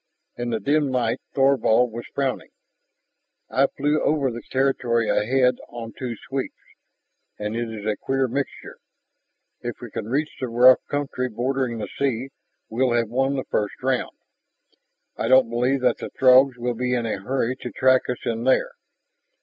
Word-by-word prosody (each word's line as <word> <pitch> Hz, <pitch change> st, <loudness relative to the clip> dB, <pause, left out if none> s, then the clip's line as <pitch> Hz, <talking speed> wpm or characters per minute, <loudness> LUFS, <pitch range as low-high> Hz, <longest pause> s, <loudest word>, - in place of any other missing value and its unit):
In 120 Hz, 0 st, -3 dB
the 115 Hz, -2 st, -1 dB
dim 145 Hz, +2 st, +1 dB
light 120 Hz, -3 st, 0 dB
Thorvald 130 Hz, -3 st, +3 dB
was 120 Hz, +1 st, -7 dB
frowning. 135 Hz, -2 st, -2 dB, 1.0 s
"I 135 Hz, +1 st, +3 dB
flew 145 Hz, +3 st, 0 dB
over 145 Hz, -4 st, +1 dB
the 120 Hz, +1 st, -6 dB
territory 125 Hz, -4 st, +1 dB
ahead 125 Hz, +2 st, +2 dB
on 115 Hz, -1 st, -8 dB
two 125 Hz, -3 st, -5 dB
sweeps, 135 Hz, -1 st, -3 dB, 0.8 s
and 105 Hz, +1 st, -4 dB
it 120 Hz, 0 st, -2 dB
is 105 Hz, -2 st, -7 dB
a 105 Hz, -1 st, 0 dB
queer 135 Hz, 0 st, 0 dB
mixture. 135 Hz, +3 st, -5 dB, 0.8 s
If -, -, -6 dB
we -, -, -9 dB
can -, -, -5 dB
reach 145 Hz, +5 st, -1 dB
the 130 Hz, -, -2 dB
rough 125 Hz, +2 st, +6 dB
country 140 Hz, -3 st, -2 dB
bordering 125 Hz, +1 st, -1 dB
the 110 Hz, -, -4 dB
sea, 135 Hz, -1 st, -1 dB, 0.4 s
we'll 125 Hz, +2 st, +1 dB
have 115 Hz, -2 st, +1 dB
won 135 Hz, +3 st, +1 dB
the 130 Hz, -, -3 dB
first 105 Hz, -1 st, 0 dB
round. 130 Hz, -1 st, -1 dB, 1.0 s
I -, -, -1 dB
don't 130 Hz, -2 st, +5 dB
believe 125 Hz, +3 st, +1 dB
that 125 Hz, -, +2 dB
the -, -, -5 dB
Throgs 130 Hz, 0 st, +5 dB
will 120 Hz, 0 st, -2 dB
be 125 Hz, +1 st, -1 dB
in 120 Hz, -1 st, -1 dB
a 110 Hz, -, -2 dB
hurry 130 Hz, +2 st, -1 dB
to 125 Hz, -, -6 dB
track 130 Hz, 0 st, +2 dB
us 125 Hz, -, -4 dB
in 115 Hz, 0 st, -2 dB
there. 130 Hz, -, +2 dB
125 Hz, 165 wpm, -23 LUFS, 120-135 Hz, 1.0 s, rough